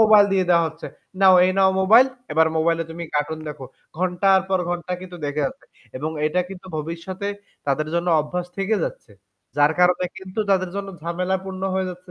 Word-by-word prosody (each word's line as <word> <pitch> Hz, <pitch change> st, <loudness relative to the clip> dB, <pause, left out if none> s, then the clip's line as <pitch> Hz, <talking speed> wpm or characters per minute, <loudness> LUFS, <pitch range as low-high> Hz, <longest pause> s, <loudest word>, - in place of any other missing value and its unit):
Mobile 215 Hz, -2 st, +7 dB
দিয়ে 190 Hz, -1 st, +2 dB
দেওয়া 170 Hz, -1 st, +5 dB
হচ্ছে, 160 Hz, +1 st, -10 dB, 0.4 s
"নাও, 190 Hz, -1 st, +8 dB
এই 185 Hz, -, +3 dB
নাও 190 Hz, -1 st, +5 dB
মোবাইল, 225 Hz, +7 st, +7 dB, 0.3 s
এবার 160 Hz, +1 st, +4 dB
মোবাইলে 165 Hz, +1 st, +1 dB
তুমি 170 Hz, +1 st, -6 dB
কার্টুন 155 Hz, +2 st, -1 dB
দেখো।" 140 Hz, -3 st, -7 dB, 0.3 s
ঘন্টার 185 Hz, +2 st, +3 dB
পর 190 Hz, -1 st, +2 dB
ঘন্টা 175 Hz, 0 st, -3 dB
কিন্তু 180 Hz, -1 st, -9 dB
দেখে 145 Hz, +1 st, -1 dB
যাচ্ছে। -, -, -9 dB, 0.3 s
এবং 155 Hz, +4 st, -3 dB, 0.2 s
এটা 180 Hz, +4 st, +1 dB
কিন্তু 190 Hz, -1 st, -10 dB
ভবিষ্যতে 170 Hz, +5 st, -5 dB, 0.4 s
তাদের 150 Hz, +2 st, 0 dB
জন্য 170 Hz, +1 st, 0 dB
অভ্যাস 175 Hz, +4 st, -4 dB
থেকে 195 Hz, +3 st, +1 dB
যাচ্ছে। 110 Hz, -, -8 dB, 0.5 s
যার 145 Hz, +1 st, +5 dB
কারণে 180 Hz, 0 st, +4 dB
কিন্তু 190 Hz, +2 st, -5 dB
তাদের 185 Hz, -2 st, +2 dB
জন্য 200 Hz, 0 st, -4 dB
ঝামেলা 180 Hz, +3 st, -1 dB
পূর্ণ 190 Hz, 0 st, -7 dB
হয়ে 190 Hz, -1 st, 0 dB
যাচ্ছে 180 Hz, 0 st, -12 dB
180 Hz, 185 wpm, -22 LUFS, 165-190 Hz, 0.5 s, নাও